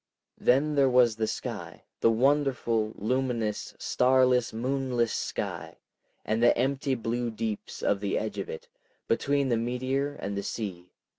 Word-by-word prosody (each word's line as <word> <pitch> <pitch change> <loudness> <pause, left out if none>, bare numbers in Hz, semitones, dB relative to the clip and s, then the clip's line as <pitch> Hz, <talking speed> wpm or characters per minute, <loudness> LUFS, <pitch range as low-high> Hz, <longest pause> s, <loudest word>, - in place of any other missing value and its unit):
Then 140 +5 +3
there 140 -2 +4
was 125 -3 +4
the 110 -1 0
sky, - - -5 0.2
the - - +4
wonderful, 120 -3 +2
luminous, 115 -2 -1
starless, 125 -1 +3
moonless 125 0 -1
sky, - - -4 0.5
and 110 +1 0
the 120 - +5
empty 135 +2 0
blue 120 +1 -2
deeps 110 -1 -5
of 100 - +2
the 100 -1 -1
edge 110 - -3
of - - -4
it, 475 +1 -7 0.4
between 140 -1 +1
the 120 - +2
meteor 130 +4 -1
and 100 -6 -4
the 100 - -1
sea. 95 -4 -5
125 Hz, 145 wpm, -28 LUFS, 110-135 Hz, 0.5 s, the